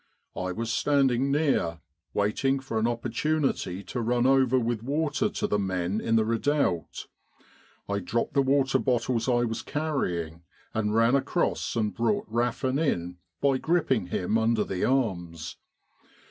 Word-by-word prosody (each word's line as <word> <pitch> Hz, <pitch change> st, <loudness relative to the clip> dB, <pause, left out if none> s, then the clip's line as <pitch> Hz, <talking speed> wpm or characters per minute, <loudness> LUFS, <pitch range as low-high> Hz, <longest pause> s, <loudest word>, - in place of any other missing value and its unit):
I 90 Hz, 0 st, -2 dB
was 115 Hz, +4 st, -3 dB
standing 135 Hz, -2 st, +2 dB
near, 140 Hz, -, +1 dB, 0.3 s
waiting 125 Hz, +7 st, +1 dB
for 130 Hz, -4 st, -3 dB
an 110 Hz, -, +2 dB
opportunity 120 Hz, -, -1 dB
to 120 Hz, -, -4 dB
run 120 Hz, +1 st, +1 dB
over 130 Hz, -1 st, +4 dB
with 120 Hz, -2 st, -1 dB
water 155 Hz, -, 0 dB
to -, -, -3 dB
the 105 Hz, -, +1 dB
men 95 Hz, +1 st, -1 dB
in 115 Hz, -, +1 dB
the 110 Hz, -1 st, +3 dB
redoubt. 115 Hz, -, 0 dB, 0.8 s
I 100 Hz, 0 st, -1 dB
dropped 115 Hz, +5 st, -2 dB
the 140 Hz, -, +4 dB
water 135 Hz, 0 st, +2 dB
bottles 120 Hz, -1 st, 0 dB
I 120 Hz, -1 st, +3 dB
was 115 Hz, -2 st, -2 dB
carrying 90 Hz, -, -2 dB, 0.3 s
and 105 Hz, -1 st, 0 dB
ran 115 Hz, +2 st, +4 dB
across 140 Hz, -, 0 dB
and 110 Hz, -2 st, 0 dB
brought 115 Hz, -2 st, 0 dB
Raffin 120 Hz, +4 st, 0 dB
in 90 Hz, -, -1 dB, 0.2 s
by 135 Hz, -2 st, +2 dB
gripping 135 Hz, -, +1 dB
him 95 Hz, +5 st, 0 dB
under 110 Hz, 0 st, +2 dB
the 95 Hz, -2 st, -3 dB
arms. 90 Hz, -11 st, -1 dB
120 Hz, 145 wpm, -27 LUFS, 105-135 Hz, 0.8 s, over